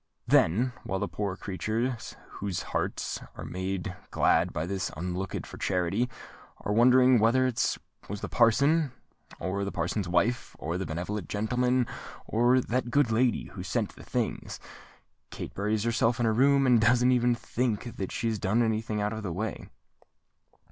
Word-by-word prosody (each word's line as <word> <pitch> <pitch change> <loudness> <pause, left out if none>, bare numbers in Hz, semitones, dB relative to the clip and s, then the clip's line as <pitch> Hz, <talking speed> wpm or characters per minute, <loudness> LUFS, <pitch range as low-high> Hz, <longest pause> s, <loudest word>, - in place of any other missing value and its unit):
Then, 120 +10 +3
while 95 - -2
the - - -1
poor 100 -3 -3
creatures 110 +6 -3 0.2
whose 95 -4 -2
hearts - - -3
are - - -7
made 95 0 -3
glad 85 +2 +3
by 80 0 -2
this 95 0 -2
unlooked 90 +2 -3
for - - -10
charity, 95 +6 0 0.5
are 105 - -1
wondering 125 +2 +6
whether 120 +4 +4
it 120 -2 0 0.3
was 100 0 -5
the - - -3
parson, 140 +5 +3 0.5
or 100 +2 -2
the 100 - -3
parson's 90 +3 -2
wife, 105 +7 0
or 85 +4 -3
this 95 - -3
benevolent 90 +5 -4
gentleman, 125 +4 +1 0.4
or 120 +3 +3
that 125 +1 -1
good 135 -1 +3
lady, 120 +1 +1
who - - -8
sent - - -2
the - - -12
things, - - -3 0.7
Kate - - -7
buries 105 +1 0
herself 115 0 +1
in 120 - +2
her 110 - +3
room, 135 +3 +4
and 125 -3 +5
doesn't 125 +3 +4
even 120 -1 +3
think 120 0 -2
that 95 - -3
she 115 - -2
has 110 -2 -1
done 110 +6 +2
any 110 -1 +1
thing 110 -2 -3
out 105 +1 -1
of 110 - -4
the 100 -4 -4
way." 105 +5 -4
110 Hz, 170 wpm, -28 LUFS, 95-125 Hz, 0.7 s, wondering